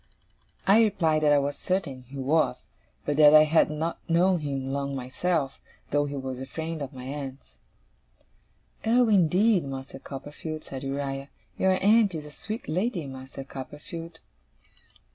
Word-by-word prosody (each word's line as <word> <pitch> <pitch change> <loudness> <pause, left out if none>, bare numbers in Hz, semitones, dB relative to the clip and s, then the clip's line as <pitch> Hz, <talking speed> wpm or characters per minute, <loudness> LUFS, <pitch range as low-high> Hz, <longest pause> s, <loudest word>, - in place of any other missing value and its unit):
I 205 +4 +6
replied 165 -8 +2
that 150 -1 +4
I 145 - +6
was 140 0 -1
certain 145 -9 -2
he 140 +2 -9
was; 135 -1 +1 0.4
but 145 0 0
that 150 0 +8
I 155 - +9
had 155 0 +4
not 155 +2 -3
known 175 +2 +4
him 135 -3 -3
long 140 0 -2
myself, 135 +3 -1 0.3
though 145 0 +2
he 145 0 -5
was 130 -1 -4
a 135 - -6
friend 160 +1 -5
of 140 -1 -4
my 130 -2 -9
aunt's. 135 0 -7 1.2
'Oh, 235 +1 +4
indeed, 190 +1 +4
Master 135 0 -7
Copperfield,' 150 +3 -7
said 135 -1 -7
Uriah. 135 0 -3 0.3
'Your 190 0 +2
aunt 210 -2 +5
is 150 -2 -5
a 150 - -10
sweet 220 +9 -6
lady, 180 +1 -1
Master 135 0 -8
Copperfield! 150 +5 -8
150 Hz, 155 wpm, -27 LUFS, 135-170 Hz, 1.2 s, I